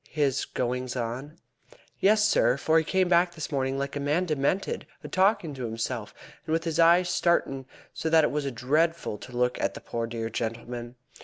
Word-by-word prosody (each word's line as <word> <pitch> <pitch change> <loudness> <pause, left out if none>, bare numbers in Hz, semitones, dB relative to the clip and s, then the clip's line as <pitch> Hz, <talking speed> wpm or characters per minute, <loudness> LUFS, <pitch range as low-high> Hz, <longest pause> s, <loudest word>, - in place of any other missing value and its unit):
"His 140 -3 0
goings 125 0 -3
on?" 125 +6 -4 0.6
"Yes, 210 +1 +4
sir; 125 - +3
for 160 +4 +3
he - - -1
came 185 +3 +1
back 175 0 +3
this 160 -1 -5
morning 135 -1 -1
like 140 +1 -3
a - - -2
man 150 +6 +1
demented, 155 +4 -1 0.2
a - - -6
talkin' 185 -5 +2
to 130 -2 -5
himself, 115 0 -3 0.4
and 160 - 0
with 165 0 +1
his 165 -1 -2
eyes 170 +2 +6
starin' 170 -7 +1 0.3
so 160 - -2
that 160 -1 +5
it - - +2
was 145 -1 -1
dreadful 150 0 0
to 125 -1 -9
look 125 0 +1
at - - -1
the - - -6
poor 115 -1 -4
dear 115 0 -4
gentleman. 120 +2 -4
140 Hz, 190 wpm, -27 LUFS, 125-165 Hz, 0.6 s, eyes